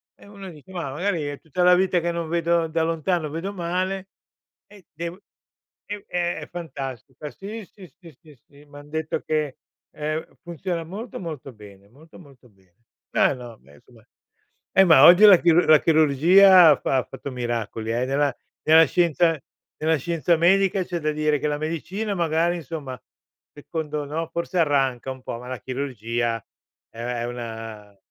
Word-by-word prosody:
E - - -19
uno 200 -2 -10
dice: 150 -5 -14
"Mah, 175 -7 -5
magari 175 +2 -2
è 145 -1 -5
tutta 165 +3 -2
la 180 0 +6
vita 185 0 +2
che 170 +1 -1
non 170 -1 -4
vedo 170 0 +1
da 160 0 -1
lontano 165 0 -1
vedo 165 +7 -5
male, 185 +2 -3 0.6
e 205 -3 -18
dev" 170 +3 -6 0.7
è 205 -1 -7
è 175 -1 -2
fantastico. 135 -5 -7
Sì, 215 +2 -8
sì, 190 -3 -14
sì, 170 -3 -14
sì, 155 -2 -17
sì, 145 +1 -19
m'han 145 0 -14
detto 160 0 -3
che, 150 -3 -2 0.3
ehm, 155 +1 -5
funziona 170 0 -4
molto, 200 +8 -8
molto 155 -7 -7
bene, 100 -2 -15
molto, 155 +9 -18
molto 135 -7 -18
bene. 95 -4 -31 0.4
Ma - - +3
no, 120 -3 -10
beh 70 +2 -20
insomma, 70 - -21 0.7
eh 195 - +6
ma 160 -6 +7
oggi 180 +4 +8
la 205 -3 +10
chirur 170 +1 +3
la 155 -1 +7
chirurgia 165 +4 +6
ha 145 - +5
fa - - 0
ha 125 - -1
fatto 135 +1 -8
miracoli 115 -2 -3
eh, 120 +2 0
nella 140 0 0 0.3
nella 160 +1 +7
scienza 170 -1 +2 0.4
nella 160 +1 +1
scienza 165 +2 0
medica, 190 +3 +3
c'è 175 -1 -4
da 155 0 0
dire 150 0 0
che 150 - -1
la 145 0 -2
medicina 185 +7 -3
magari, 170 0 +1
insomma 145 -5 -7 0.5
secondo 150 0 -5
no, 155 +3 -4
forse 170 +2 -3
arranca 135 -5 +1
un 130 -1 -8
po', 115 - -6
ma 125 - -11
la 130 -3 -6
chirurgia 120 -3 -3 0.5
è 115 - -16
è 120 0 -3
una 115 -4 -8
155 Hz, 170 wpm, -23 LUFS, 135-175 Hz, 0.7 s, la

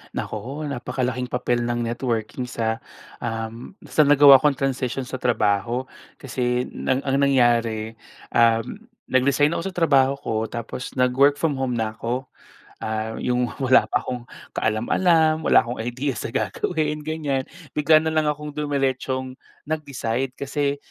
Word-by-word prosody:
Naku, 130 +8 -4
napakalaking 125 -1 -2
papel 125 -1 0
ng 120 0 -1
networking 120 0 -2
sa, 115 -2 -2 0.4
um, 115 +8 -5
sa 155 - +3
nagawa 145 -2 +8
kong 145 0 +2
transisyon 135 -1 -2
sa 130 - -5
trabaho. 115 +1 +1 0.3
Kasi, 125 -1 -2
nang 130 +1 -1
ang 135 0 +1
nangyari, 115 -5 +2 0.3
um, 115 - +2 0.3
nag-resign 140 +3 +3
ako 170 - -2
sa - - -24
trabaho 140 -6 +4
ko, 125 - -4
tapos 120 +2 -6
nag-work 130 +3 +4
from 155 -4 +1
home 130 -2 -1
na 110 -2 -1
ako. 125 +3 -3 0.5
Ah, 110 0 -3
yung 125 0 0
wala 130 -1 +4
pa - - +2
akong 125 -1 -4 0.3
kaalam-alam. 155 +8 +2
Wala - - +5
akong 120 -1 -4
idea 125 +4 -2
sa 105 - -5
gagawin, 150 - -1
ganyan. 150 -3 -2 0.3
Bigla 150 +1 +5
na 160 0 -1
lang 155 -1 +2
akong 150 0 -4
dumeretsong 135 -3 -1 0.3
nag-decide. 135 -5 -2
Kasi, 140 0 -1
130 Hz, 140 wpm, -23 LUFS, 120-145 Hz, 0.5 s, nagawa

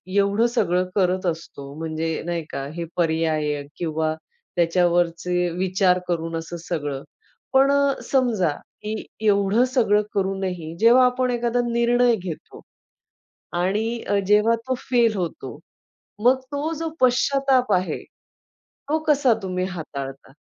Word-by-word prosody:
एवढं 200 +3 +3
सगळं 185 -6 +1
करत 185 -1 +1
असतो 160 -5 -5
म्हणजे 160 0 -2
नाही 170 -1 -2
का 135 - -4
हे 170 - -3
पर्याय 160 -3 0 0.2
किंवा 160 -2 -1 0.4
त्याच्यावरचे 175 0 +1
विचार 185 0 +2
करून 165 -1 -2
असं 165 +1 -6
सगळं 145 -5 -3 0.5
पण 270 +1 +5 0.4
समजा, 235 - +2 0.3
की 215 +1 -4 0.2
एवढं 200 +3 +3
सगळं 210 -5 +3
करूनही 190 -4 -2
जेव्हा 240 +3 +6
आपण 250 0 +1
एखादा 240 0 0
निर्णय 240 0 +3
घेतो 180 -6 -8 1.0
आणि 220 +5 -1
अ, 205 - +2
जेव्हा 210 +3 +4
तो 260 - +1 0.2
फेल 235 -3 +4
होतो, 160 -5 -5 0.7
मग 260 +2 +5
तो 290 +3 -2
जो 325 0 -2
पश्चाताप 255 -1 +3
आहे, 185 0 0 0.7
तो 310 +2 -3
कसा 280 -5 +4
तुम्ही 185 -1 -2
हाताळता? 140 -7 -7
190 Hz, 120 wpm, -23 LUFS, 165-235 Hz, 1.0 s, जेव्हा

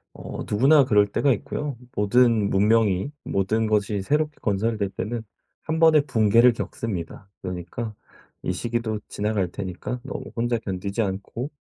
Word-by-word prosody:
어 - - -7
누구나 135 +7 +5
그럴 105 -5 +4
때가 140 +5 +3
있고요. 140 +4 -3 0.2
모든 110 0 +3
문명이 105 +2 +3
모든 110 +3 0
것이 105 -2 0
새롭게 150 +7 0
건설이 110 +2 0
될 100 -2 -1
때는 115 +3 -4 0.4
1 160 +1 -2
번의 160 -2 +6
붕괴를 115 0 +5
겪습니다. 100 -4 -5
그러니까 90 +5 -5 0.5
이 90 - -1
시기도 115 +1 -2
지나갈 100 -3 -1
테니까 95 +7 -5
너무 - - -5
혼자 120 0 +1
견디지 100 0 -4
않고 105 +6 -3
110 Hz, 315 characters per minute, -24 LUFS, 100-120 Hz, 0.5 s, 번의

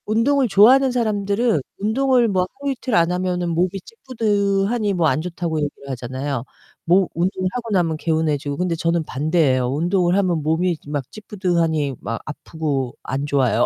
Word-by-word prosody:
운동을 255 +5 +2
좋아하는 250 +7 +6
사람들은 215 - 0 0.2
운동을 245 +3 +2
뭐 185 -3 +1
하루이틀 270 -4 -2
안 170 0 +3
하면은 180 -1 -1
몸이 175 +2 +1 0.2
찌뿌둥하니 210 - 0
뭐 170 -3 +2
안 155 - +1
좋다고 170 -2 -3
얘기를 145 -1 -5
하잖아요. 130 +1 -4 0.4
뭐 180 +2 +4
운동하고 185 +7 -2
나면 170 -5 +1
개운해지고 155 -3 -1
근데 180 -1 0
저는 165 0 0
반대예요. 145 -3 +1
운동을 175 +5 +1
하면 180 -5 +1
몸이 165 +3 +1
막 145 -3 -4
찌뿌둥하니 170 -9 -1
막 115 - -4
아프고 145 -4 -3
안 135 +2 -3
좋아요. 140 -4 +2
175 Hz, 365 characters per minute, -21 LUFS, 155-205 Hz, 0.4 s, 좋아하는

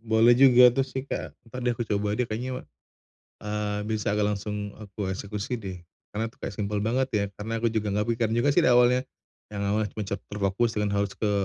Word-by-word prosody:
boleh 115 +1 +5
juga 125 -1 +7
tuh 135 - +1
sih, 130 0 -5
Kak. - - -5
Entar 125 +3 -8
deh, 120 -1 0
aku 120 - -2
coba 105 0 -1
deh 125 - +1
kayaknya, 125 +3 -4 0.8
eee, 105 0 -2
bisa 105 -2 0
agak 105 0 +1
langsung 105 0 -4
aku 100 -2 -5
eksekusi 100 +5 -3
deh 95 -4 -6 0.3
karena 110 +2 -2
itu 115 - -10
kayak 100 - -5
simple 105 0 -1
banget 125 +5 +1
ya, 105 -1 +2
karena 110 +2 -4
aku 115 - +2
juga 105 -2 -1
nggak 105 - +1
kepikiran 115 -1 +1
juga 120 +5 +2
sih 140 - +4
di - - +5
awalnya, 125 +1 +4 0.5
yang 100 - -3
awalnya 105 +1 0
cuman 105 - -4
cet 100 -1 -3
terfokus 105 +3 0
dengan 105 -1 0
harus 100 -1 0
ke 105 -2 -1
110 Hz, 215 wpm, -26 LUFS, 105-120 Hz, 0.8 s, juga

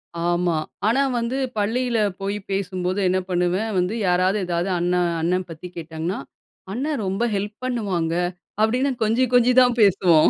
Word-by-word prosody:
ஆமா. 175 0 +1 0.3
ஆனா 255 +5 +3 0.2
வந்து 235 +3 -2 0.2
பள்ளியில 235 +3 0 0.2
போய் 200 +1 -2
பேசும்போது 185 0 -1
என்ன 185 +1 +2
பண்ணுவேன் 180 +5 0
வந்து, 180 +4 0
யாராவது 185 +3 +2
ஏதாவது 175 +2 -1
அண்ணன் 175 0 +1
அண்ணன் 180 +2 0
பத்தி 165 +2 -8
கேட்டாங்கன்னா, 165 +3 -4 0.5
"அண்ணன் 275 0 -2
ரொம்ப 195 +5 -1
ஹெல்ப் 205 +2 -3
பண்ணுவாங்க" 195 -10 -1 0.5
அப்பிடின்னு 250 +5 +2
கொஞ்சி, 225 +4 +2
கொஞ்சி 245 0 +5
தான் 245 -1 +3
பேசுவோம். 175 -5 +5
190 Hz, 140 wpm, -23 LUFS, 175-225 Hz, 0.5 s, கொஞ்சி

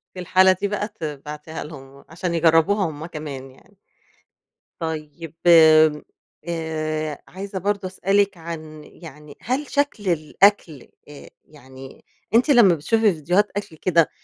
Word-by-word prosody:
في 185 - -8
الحالة 185 +1 +4
دي 185 +2 -1
بقى 205 +1 -3
تبعتيها 150 -2 -7
لهم 140 -2 -12
عشان 170 +1 -4
يجربوها 165 +4 +3
هم 155 +1 -8
كمان 145 -5 -8
يعني. 190 +9 -23 1.0
طيب 160 -1 -6 1.2
آآ، 155 -2 -3
عايزة 195 +1 -7
برضه 200 0 -2
أسألِك 195 +1 0
عن 155 -2 -9
يعني 150 -3 -14
هل 265 +5 -2
شكل 280 -9 -1
الأكل 165 - +1 0.2
آآ 145 - -12 0.2
يعني 130 -2 -14 0.3
أنتِ 245 +6 +3
لما 230 -10 +6
بتشوفي 215 +7 +1
فيديوهات 175 +7 +1
أكل 200 -5 -6
كده 165 -1 +2
165 Hz, 120 wpm, -22 LUFS, 150-195 Hz, 1.2 s, لما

